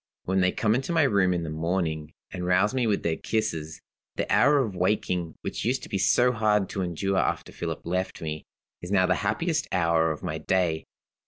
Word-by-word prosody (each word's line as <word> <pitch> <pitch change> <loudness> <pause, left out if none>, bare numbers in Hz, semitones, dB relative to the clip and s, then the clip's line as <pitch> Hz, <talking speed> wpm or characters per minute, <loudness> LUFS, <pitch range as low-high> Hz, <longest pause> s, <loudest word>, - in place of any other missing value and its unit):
When 95 +1 0
they 90 0 +3
come 110 -1 +1
into 130 +6 -1
my 165 -2 +4
room 100 -8 +3
in 85 -2 -1
the 80 - -4
morning, 80 -1 -2 0.2
and 90 - -4
rouse 95 +5 +2
me 125 -3 +1
with 105 -2 0
their 80 -1 0
kisses, 80 -8 -2 0.3
the - - -1
hour 145 +3 +5
of 115 -9 0
waking, 90 -3 0
which - - -4
used 125 +4 0
to - - -9
be 95 - -1
so 100 +6 +4
hard 105 -4 +1
to 95 - -3
endure 95 +2 -1
after - - -1
Philip - - -4
left 90 +2 -2
me, 80 -1 -5 0.3
is 90 - -7
now 95 -2 +3
the 90 - +3
happiest 155 - 0
hour 85 -3 +2
of 80 - -4
my 80 +1 -3
day." 80 -1 0
95 Hz, 210 wpm, -26 LUFS, 85-105 Hz, 0.3 s, hour